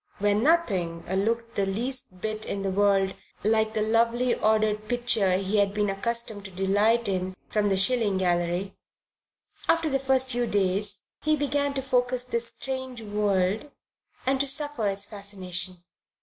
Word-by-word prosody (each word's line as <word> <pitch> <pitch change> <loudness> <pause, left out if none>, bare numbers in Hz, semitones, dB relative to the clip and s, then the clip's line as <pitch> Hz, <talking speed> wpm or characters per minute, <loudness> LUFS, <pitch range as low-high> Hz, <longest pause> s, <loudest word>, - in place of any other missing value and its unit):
where 205 0 +2
nothing 205 - +1 0.2
looked 230 +1 -1
the 200 - 0
least 225 -2 -2
bit 215 0 -2
in 195 - -3
the 195 - -1
world 195 -1 +2 0.3
like 220 +1 +2
the 215 - +1
lovely 230 +3 +2
ordered 215 -1 +1
picture 240 -5 +2
he 195 +2 -1
had 200 0 +2
been 205 -1 +1
accustomed 220 0 -3
to 190 - -8
delight 205 +5 +2
in 185 -1 -2
from 210 -1 +1
the 195 - +2
shilling 210 -1 +3
gallery 175 +1 0 0.9
after 330 -2 +3
the 270 - +2
first 265 -1 +1
few 240 0 0
days 200 0 0
he 310 0 +2
began 285 -1 0
to 270 -1 -3
focus 250 -1 +1
this 235 -1 -2
strange 260 -1 -5
world 205 +3 0 0.6
and 265 +1 +1
to 280 - +1
suffer 290 -5 +2
its 200 0 -1
fascination. 185 -3 -4
215 Hz, 155 wpm, -26 LUFS, 195-245 Hz, 0.9 s, shilling